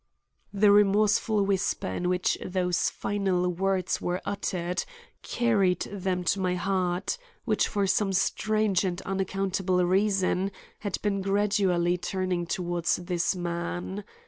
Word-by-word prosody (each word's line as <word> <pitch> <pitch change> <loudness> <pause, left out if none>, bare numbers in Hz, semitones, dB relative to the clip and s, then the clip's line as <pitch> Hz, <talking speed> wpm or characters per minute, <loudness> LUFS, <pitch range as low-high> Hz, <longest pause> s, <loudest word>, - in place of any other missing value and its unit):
The 205 0 +4
remorseful 210 +1 +3
whisper 195 -2 0
in 175 - -2
which 180 0 +1
those 180 -1 0
final 190 -3 -1
words 185 +1 0
were 180 +1 -1
uttered 180 -3 -2 0.4
carried 200 -7 +1
them 190 -2 -2
to 195 - +1
my 180 -1 0
heart, 185 - -1 0.3
which - - +2
for 200 -2 0
some 195 +1 +1
strange 210 +1 +1
and 180 -2 -2
unaccountable 190 -1 0
reason 195 0 +2 0.3
had 205 -3 -3
been 200 -2 0
gradually 195 -3 +1
turning 180 -1 -2
toward 175 -2 -2
this 175 0 0
man. 175 +3 -4
190 Hz, 120 wpm, -27 LUFS, 180-200 Hz, 0.4 s, The